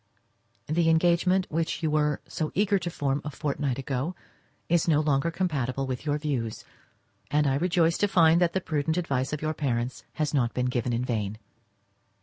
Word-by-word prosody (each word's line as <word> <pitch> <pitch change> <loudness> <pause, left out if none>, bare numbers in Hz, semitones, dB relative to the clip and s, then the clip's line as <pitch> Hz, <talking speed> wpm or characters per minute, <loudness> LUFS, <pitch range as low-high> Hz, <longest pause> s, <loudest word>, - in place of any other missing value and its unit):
The 165 +2 +2
engagement 175 +3 +3
which 165 +1 -1
you 155 - +1
were 150 -1 +1 0.3
eager 200 0 +3
to 175 - -3
form 140 -3 -1
a 150 - -4
fortnight 140 -2 -2
ago 135 +5 -3 0.5
is 170 0 +2
no 155 -3 +4
longer 150 +1 +1
compatible 140 -7 -1
with 130 +3 -5
your 145 0 +1
views, 135 -7 -3 0.6
and 150 0 +2
I 135 - +2
rejoice 170 +2 +2
to 205 - +3
find 170 -3 +5
that 170 -1 +2
the 190 - 0
prudent 160 0 -1
advice 135 -6 -1
of 150 0 -4
your 155 0 0
parents 125 -4 -2
has 150 -2 -1
not 120 -5 +1
been 125 - 0
given 125 -1 -1
in 120 +1 -1
vain. 110 -4 -2
150 Hz, 175 wpm, -27 LUFS, 130-165 Hz, 0.6 s, find